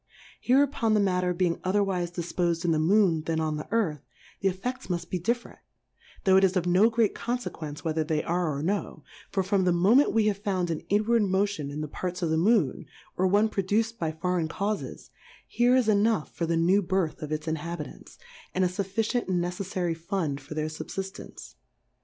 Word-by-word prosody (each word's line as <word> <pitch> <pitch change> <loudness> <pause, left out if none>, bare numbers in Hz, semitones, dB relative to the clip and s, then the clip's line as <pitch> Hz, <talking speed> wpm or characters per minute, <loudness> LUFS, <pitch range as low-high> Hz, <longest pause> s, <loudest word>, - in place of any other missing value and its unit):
Hereupon 255 -4 +2
the - - +4
Matter 180 -2 +1
being 175 -1 0
otherwife 185 -2 0
difpos'd 175 0 -1
in 170 - +2
the 155 - +2
Moon 175 -1 +3
than 165 -1 0
on 155 -1 -1
the 150 - -6
Earth, 190 - 0 0.4
the 195 - +2
Effe£ls 245 +8 -5
muft 175 -2 -3
be 180 - -1
different; 235 +7 -2 0.6
tho' 190 -1 +5
it 190 - +4
is 190 0 +3
of 180 - 0
no 185 +6 +5
great 230 -2 +2
Confequence 170 -11 -5
whether 160 -1 0
they 155 -1 -1
are 175 -1 0
or 145 - -4
no; 200 +4 -2 0.3
for 195 -1 0
from 195 0 +1
the 180 - +3
Moment 205 +11 +4
we 225 -1 +2
have 205 -2 +1
found 185 -4 -1
an 160 - -2
inward 215 +3 +3
Motion 195 -6 0
in 145 +2 -5
the 155 - -3
Parts 180 +4 -4
of 165 - 0
the 160 - +2
Moon, 185 - +2 0.3
or 185 - +2
one 205 +3 +4
produced 215 +3 -1
by 160 -2 -1
foreign 170 +1 -1
Caufes, 200 +5 -4 0.4
here 245 +1 +3
is 255 -4 +3
enough 215 -4 +2
for 170 - -2
the 165 0 +1
new 180 +5 +4
Birth 185 -4 -1
of 150 -1 -5
its 155 +1 -3
Inhabitants, 160 - -5 0.4
and 185 0 +3
a - - +1
fuf 190 +1 -4
ficient 225 +4 0
and 185 -2 +1
neceffary 180 -1 -2
Fund 165 -4 -3
for 145 +3 -9
their 155 0 -1
Sul> 155 0 -7
fiftance. 195 0 -7
185 Hz, 200 wpm, -27 LUFS, 165-205 Hz, 0.6 s, tho